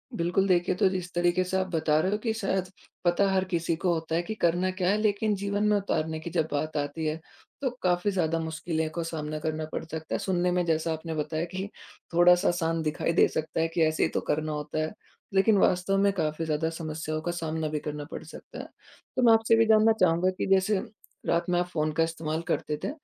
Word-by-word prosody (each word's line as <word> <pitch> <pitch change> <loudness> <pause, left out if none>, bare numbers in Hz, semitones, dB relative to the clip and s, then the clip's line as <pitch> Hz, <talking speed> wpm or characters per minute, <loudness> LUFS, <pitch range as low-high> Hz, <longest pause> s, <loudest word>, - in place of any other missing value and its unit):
बिल्कुल, 175 +3 +1
देखिए 180 0 +2
तो 190 - +3
जिस 180 -2 -4
तरीके 175 +1 +2
से 185 +1 -1
आप 190 0 0
बता 155 -1 +2
रहे 185 - 0
हो 210 - +1
कि 220 +1 -1
शायद 195 -4 -1 0.4
पता 175 +3 +3
हर 190 -1 +2
किसी 170 -2 -1
को 175 +1 +1
होता 160 0 -2
है 170 - +2
कि 220 +5 -5
करना 175 -1 +1
क्या 185 -1 0
है 205 - +3
लेकिन 210 0 +1
जीवन 200 +1 -1
में 210 - +4
उतारने 160 -5 -1
की 160 - -6
जब 165 -2 0
बात 155 +1 -2
आती 145 +2 -2
है, 155 +1 -1 0.4
तो 270 - +1
काफ़ी 180 +2 +2
ज़्यादा 165 -4 0
मुश्किलें 160 0 -2
काे 170 - -1
सामना 155 -2 -4
करना 155 0 -2
पड़ - - -3
सकता 160 0 -5
है। - - -1
सुनने 180 -1 0
में 180 0 +1
जैसा 160 0 0
आपने 160 +1 -5
बताया 155 +2 -2
कि 190 +2 -4 0.4
थोड़ा-सा 175 +2 +5
शांत 165 -2 -1
दिखाई 155 +2 -1
दे - - +5
सकता 155 +1 -3
है 165 - +2
कि 165 +1 -2
ऐसे 155 0 +1
ही - - +2
तो - - -2
करना 155 +1 -1
होता 150 +1 -3
है, 155 +3 -2 0.4
लेकिन 200 +2 +4
वास्तव 190 +1 +2
में 200 0 +4
काफ़ी 160 -3 -1
ज़्यादा 160 +1 0
समस्याओं 155 -1 -4
का 175 - -2
सामना 160 -2 -2
भी 150 0 -2
करना 150 0 -5
पड़ - - -6
सकता - - -11
है। - - -6 0.5
तो 255 - +1
मैं 230 -2 +7
आपसे 225 0 +3
ये 225 - +5
भी 225 - +5
जानना 220 0 +5
चाहूँगा 175 +1 +4
कि - - -1
जैसे 195 +1 +2 0.5
रात 170 0 +1
में 175 0 +2
आप 180 - +1
फ़ोन 155 -3 -1
का 165 - +2
इस्तेमाल 160 -1 -3
करते 150 -3 -1
थे, - - -1
170 Hz, 235 wpm, -27 LUFS, 160-190 Hz, 0.5 s, मैं